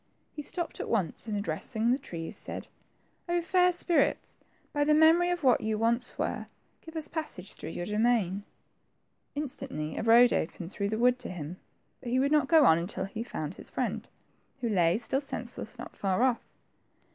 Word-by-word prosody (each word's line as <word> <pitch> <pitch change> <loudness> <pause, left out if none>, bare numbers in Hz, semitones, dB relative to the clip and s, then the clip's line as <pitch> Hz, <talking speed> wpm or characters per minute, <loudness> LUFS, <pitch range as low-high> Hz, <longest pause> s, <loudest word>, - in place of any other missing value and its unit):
Pie 300 - -4
stopped 340 +3 -4
at - - -4
once, 200 -1 -1
and 210 -1 -1
addressing 220 +5 -1
the 260 - +2
trees, 165 - -7
said, - - -7 0.3
— - - -41
0 345 0 +1
fair 360 +1 +4
spirits, 345 -1 +1 0.4
by 290 -1 +2
the 300 +1 +4
memory 325 +3 +6
of 350 -2 -1
what 255 -3 +5
you 215 0 -1
once 235 +3 0
were, - - -2 0.4
give 325 0 -11
us 315 -1 -3
passage 305 - -5
through - - -7
your 175 - -4
domain.'' 210 -2 +1 0.9
Instantly 260 - -4
a - - -1
road 235 +2 +6
opened 170 +2 -2
through 200 -1 -2
the 220 - -1
wood 250 +2 +3
to - - -6
him, 175 -1 -6 0.4
but 245 - -7
he 250 - +1
would 280 +2 +2
not 300 -3 +4
go 320 -2 +6
on 160 -6 +6
unfil 185 +2 -3
he 205 - -8
had 235 - -8
found 155 +2 -3
his - - -11
friend, - - -3 0.5
who 235 - 0
lay, 175 -4 +3
still 265 +4 -1
senseless, 280 - -5
not - - -9
far 195 +3 +1
off. 255 -2 +2
235 Hz, 190 wpm, -29 LUFS, 195-295 Hz, 0.9 s, memory